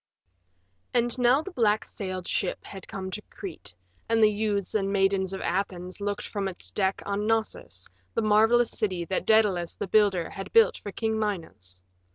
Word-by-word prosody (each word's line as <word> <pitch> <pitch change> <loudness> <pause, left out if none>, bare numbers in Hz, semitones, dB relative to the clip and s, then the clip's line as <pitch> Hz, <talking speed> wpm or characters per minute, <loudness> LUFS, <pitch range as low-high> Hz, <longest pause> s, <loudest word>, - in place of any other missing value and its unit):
III - - +6
And 240 +1 -3
now 250 +5 +4
the 390 - -7
black 220 -9 +2
sailed 185 -3 -5
ship 185 - -2
had 195 -2 -9
come 190 -3 -5
to 210 - -5
Crete, 155 - -9 0.3
and 230 0 +3
the 215 -1 +6
youths 205 -2 -1
and 195 -2 0
maidens 195 -1 +2
of 190 - -4
Athens 185 0 -2
looked 205 0 -2
from 200 -2 -2
its 185 -2 -7
deck 190 -1 0
on 205 +1 -1
Knossos, 220 - -2 0.3
the 230 - +1
marvelous 225 +3 +4
city 185 -6 -1
that 185 - -2
Daedalus 205 -6 +3
the - - -3
builder 195 -4 +3
had 195 0 -7
built 455 0 +6
for 205 - -7
King 220 +2 -1
Minos. 160 - -4
200 Hz, 180 wpm, -27 LUFS, 185-220 Hz, 0.3 s, III